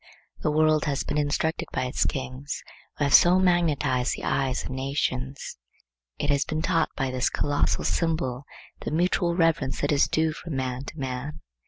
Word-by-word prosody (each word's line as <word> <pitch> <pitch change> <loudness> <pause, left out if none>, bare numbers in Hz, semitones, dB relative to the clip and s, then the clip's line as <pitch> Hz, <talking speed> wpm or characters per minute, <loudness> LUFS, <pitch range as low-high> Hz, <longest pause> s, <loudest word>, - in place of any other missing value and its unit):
The - - 0
world 155 0 +3
has 140 -2 -1
been 150 - -1
instructed 150 +2 0
by - - -1
its 125 - 0
kings, 130 +2 -4 0.3
who - - 0
have 140 - +1
so 175 +1 +7
magnetized 150 -8 +2
the - - -9
eyes 130 -2 0
of - - -6
nations. 130 - -3 0.6
It 145 - 0
has 140 0 +2
been 155 +1 -3
taught 165 -2 +2
by 135 -2 -1
this 130 0 +1
colossal 145 0 0
symbol 145 -6 -1 0.3
the - - -4
mutual 170 +2 +1
reverence 165 -6 +1
that 145 - +1
is 145 -1 +4
due 160 0 +1
from 165 -1 -6
man 130 0 -3
to 155 - -9
man. 135 +3 -4
145 Hz, 175 wpm, -26 LUFS, 130-160 Hz, 0.6 s, so